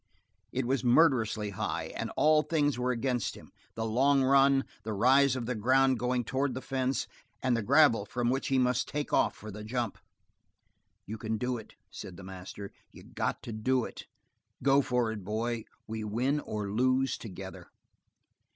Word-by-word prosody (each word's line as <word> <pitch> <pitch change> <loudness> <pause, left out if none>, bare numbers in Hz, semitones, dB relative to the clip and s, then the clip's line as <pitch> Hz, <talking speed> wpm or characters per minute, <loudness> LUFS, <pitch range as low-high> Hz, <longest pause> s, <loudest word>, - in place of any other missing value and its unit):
It 130 -1 -1
was 130 0 0
murderously 120 -6 +3
high, 95 - -3
and - - -3
all 155 0 +5
things 145 -5 0
were 125 +1 0
against 125 -1 -1
him, - - -14 0.2
the 115 - -2
long 135 +5 +3
run, 135 0 +4 0.2
the 110 +1 -4
rise 130 +5 +4
of 125 -2 -3
the 125 - -1
ground 130 +3 +3
going 125 0 0
toward 130 +3 -1
the 130 - -4
fence, 130 0 -1 0.4
and 130 -2 +2
the 115 - 0
gravel 125 -3 +4
from 120 +1 0
which 135 +1 -1
he 135 - +2
must 125 -1 +2
take 145 0 -4
off - - +3
for 110 - -9
the 105 +2 -8
jump. 120 0 -3 1.1
"You 110 +2 -6
can 110 0 -2
do 125 +2 -1
it," 110 - -12 0.2
said 90 - -9
the 100 - -10
master. 95 +2 -8 0.2
"You - - -14
got - - -3
to - - -6
do 125 +3 +1
it! - - -9 0.6
Go 140 0 +5
for 125 -4 0
it, 105 -3 -6
boy. 110 +3 -2 0.2
We 110 0 -5
win 125 +8 0
or 105 -7 -4
lose 130 +4 +2
together!" 95 -3 -9
125 Hz, 180 wpm, -30 LUFS, 110-135 Hz, 1.1 s, all